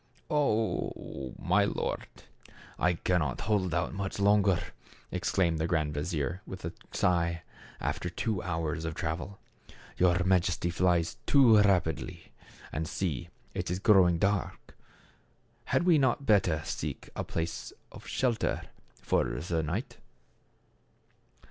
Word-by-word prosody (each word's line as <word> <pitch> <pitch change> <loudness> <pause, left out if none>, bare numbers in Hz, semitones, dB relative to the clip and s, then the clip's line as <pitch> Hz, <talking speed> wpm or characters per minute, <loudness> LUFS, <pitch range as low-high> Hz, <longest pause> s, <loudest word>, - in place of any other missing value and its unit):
"Oh! 110 - -1
my - - +3
lord, - - -2 0.7
I 90 +1 +3
cannot 90 -2 0
hold 100 -4 +1
out 95 +5 -2
longer," 100 -2 +4 0.5
exclaimed 90 -2 +1
the 80 - 0
grand 75 -3 0
vizier 75 +3 -2
with 95 -3 -7
a 80 - -4 0.2
sigh, 85 -1 +1 0.4
after - - -2
two 105 -5 -2
hours 80 -2 -2
of 80 -1 -3
travel. 80 +4 -4 0.6
"Your 90 0 +3
Majesty 90 -1 +2
flies 85 -2 +1
too 125 -7 +7
rapidly. 90 -7 +1 0.4
And 80 +1 -2
see; 80 -9 -3 0.2
it - - -3
is 90 - -1
growing 95 -4 +5
dark. 100 +2 -1 0.9
Had 175 - +1
not 145 -8 +4
we - - -11
better 90 - +3
seek - - -5
a - - -2
place 85 0 -4 0.2
of - - -12
shelter 125 -4 0 0.4
for - - +2
the 80 +7 -2
night 75 - -3
90 Hz, 120 wpm, -30 LUFS, 80-100 Hz, 0.9 s, too